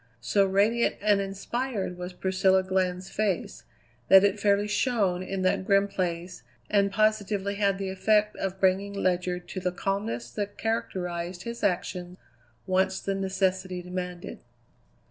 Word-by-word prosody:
So 195 - +2
radiant 210 +5 +2
and 205 -1 +3
inspired 200 +1 -3
was 180 +1 -6
Priscilla 190 +1 +2
Glenn's 185 -1 -1
face 200 -5 -2 0.4
that 190 0 +8
it 200 +1 +2
fairly 205 0 +2
shone 205 -4 +1
in 190 0 -3
that 185 - +2
grim 195 +1 +3
place 180 -2 -3 0.3
and 200 -1 +3
positively 205 -1 +1
had 200 -1 +2
the 195 -1 -3
effect 210 +2 +2
of 190 0 -3
bringing 195 +1 +2
Ledyard 180 -2 -1
to - - -4
the 180 0 -1
calmness 175 - -3
that 205 +5 -4
characterized 180 -5 -3
his 235 -1 -6
action 180 -2 -1 0.5
once 190 0 +1
the 195 - -2
necessity 190 -1 -1
demanded. 180 -1 -6
190 Hz, 140 wpm, -27 LUFS, 180-200 Hz, 0.5 s, that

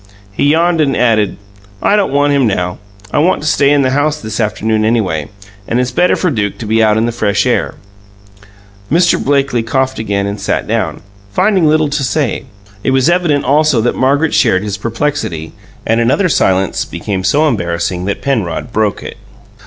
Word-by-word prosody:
He 100 - -1
yawned, 165 +1 +2
and 140 -3 +1
added: 110 -4 +1 0.4
"I 205 - +2
don't 200 -8 +1
want 145 +1 +2
him 135 -4 +2
now. 90 -3 -2 0.3
I - - +1
want 165 0 +1
to - - -2
stay 140 -2 +3
in 145 -1 +3
the 130 - +1
house 145 +2 0
this 110 -2 -5
afternoon, 110 0 0
anyway. 100 -10 0 0.4
And 120 - 0
it's 125 0 -1
better 175 +8 +2
for 180 - 0
Duke 105 -6 -2
to 115 - -7
be 110 +1 +1
out 110 -1 +3
in 110 - +1
the 120 - -1
fresh 105 -3 0
air." - - 0 1.2
Mr. 170 +2 +3
Blakely 135 -4 +1
coughed 130 +3 -1
again 100 -2 -1
and 100 +1 -4
sat - - -1
down, - - -2 0.3
finding 185 - +2
little 155 0 +3
to 145 -1 -2
say. 135 0 -1 0.4
It - - 0
was 130 +5 +3
evident, 170 -5 +1
also, 150 -2 +3
that 120 - 0
Margaret 140 +4 +1
shared 105 -7 +2
his 105 -2 -3
perplexity; 115 - -3 0.3
and 115 +1 +1
another 135 +11 +2
silence 95 - +1
became 95 -2 -4
so 150 +9 +2
embarrassing 90 - -2
that 100 - -3
Penrod 115 -4 -2
broke 110 -2 0
it. - - -8
125 Hz, 185 wpm, -14 LUFS, 105-145 Hz, 1.2 s, stay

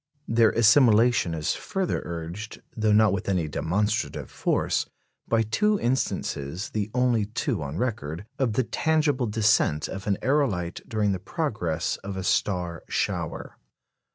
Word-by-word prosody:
Their 115 -1 +4
assimilation 115 - +4
is 75 -1 -1
further 190 -2 -2
urged 85 +6 -6 0.2
though 110 -1 +1
not 105 -1 +5
with 100 0 -2
any 90 -5 +1
demonstrative 105 +8 -1
force - - 0 0.4
by 115 -1 +2
two 210 - +1
instances, 95 - -2
the 105 -1 -2
only 120 -4 +2
two 110 -6 -2
on 75 +2 -5
record, 95 - -3
of 125 -5 +1
the 130 - +2
tangible 150 -2 +1
descent 105 -8 +2
of 95 +1 -7
an 100 - +1
aerolite 120 - 0
during 105 -2 +1
the 95 - -2
progress 90 - -2
of 100 -1 -7
a 95 - -3
star 90 -3 0
shower. - - -3
105 Hz, 140 wpm, -26 LUFS, 90-120 Hz, 0.4 s, not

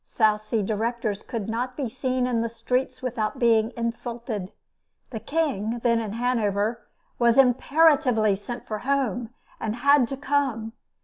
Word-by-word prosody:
South 215 -2 +2
Sea 215 0 -1
directors 220 0 -2
could 225 -5 -5
not 245 +3 -3
be 275 -4 -1
seen 255 +1 -1
in 240 -2 0
the 230 - -1
streets 255 +2 -2
without 235 -1 -2
being 230 -2 +3
insulted. 230 -4 -4 0.6
The 225 - -4
King, 240 -7 -1
then 235 -1 +3
in 215 -3 -4
Hanover, 225 -2 0 0.3
was 235 0 +4
imperatively 260 -4 +4
sent 240 +5 -7
for 215 -1 -4
home, 250 -4 -1 0.3
and 220 -1 -2
had 280 0 +4
to 270 - -5
come. 265 -6 -1
235 Hz, 145 wpm, -25 LUFS, 220-255 Hz, 0.6 s, was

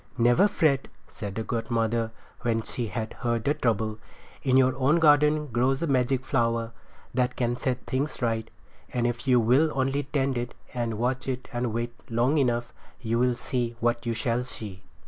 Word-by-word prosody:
"Never 120 - +5
fret," 145 -8 +2 0.2
said 100 -2 -7
the 110 - -2
godmother 115 0 0 0.3
when 115 -2 0
she 120 +1 -4
had 110 +2 -4
heard 120 -2 0
the 145 - +3
trouble. 110 -4 0 0.4
"In 130 -2 +3
your 130 -1 +4
own 140 +5 +3
garden 150 -1 +5
grows 130 +5 +1
a - - +2
magic 130 -2 +1
flower 115 -4 0 0.4
that 125 0 +1
can 120 -1 0
set 125 0 -2
things 140 +4 -2
right; 115 -2 -1 0.4
and 120 -1 0
if 120 +1 -2
you 125 -2 +5
will 130 +8 +4
only 135 +1 +1
tend 135 -2 -1
it 120 0 -5 0.2
and 120 -3 -2
watch 125 +4 -1
it 130 -1 -3
and 120 -1 -1
wait 120 +1 -2 0.2
long 125 +6 +2
enough 120 -3 0 0.3
you 115 0 0
shall 125 -1 +3
see 120 -1 -2
what 120 0 0
you 115 - 0
shall 120 +1 0
see." 105 -6 -8
120 Hz, 180 wpm, -27 LUFS, 115-130 Hz, 0.4 s, Never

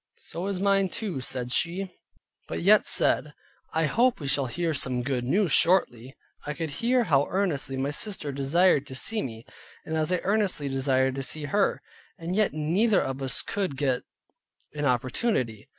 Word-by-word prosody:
"So 175 +4 -6
is 195 -2 -2
mine 195 -1 +2
too," 185 - -4
said 125 -1 -3
she, 180 +6 0 0.6
but - - -4
yet 210 +3 +5
said, 150 -1 +2 0.4
"I 160 0 +1
hope 235 - +2
we 145 - -7
shall 135 0 +1
hear 165 +6 -2
some 130 -3 0
good 125 -1 -2
news 180 +7 +1
shortly." 135 -9 +3 0.3
I 150 - -5
could 160 -2 -4
hear 245 +1 +3
how 145 -8 +2
earnestly 165 -9 -1
my 135 +2 -1
sister 155 -3 -4
desired 140 +2 +2
to 130 - -8
see 215 +10 -1
me, 115 -2 -7 0.4
and 160 - -3
I 160 - +1
as 155 - 0
earnestly 195 -8 0
desired 130 -1 +1
to 135 - -4
see 150 +4 -3
her; 200 +7 0 0.3
and 170 +2 -4
yet 215 -1 +2
neither 175 +9 +2
of 135 +1 -4
us 135 -1 0
could 190 -9 -3
get 130 -3 0 0.7
an 150 -1 -3
opportunity. 125 - -1
150 Hz, 175 wpm, -26 LUFS, 135-190 Hz, 0.7 s, yet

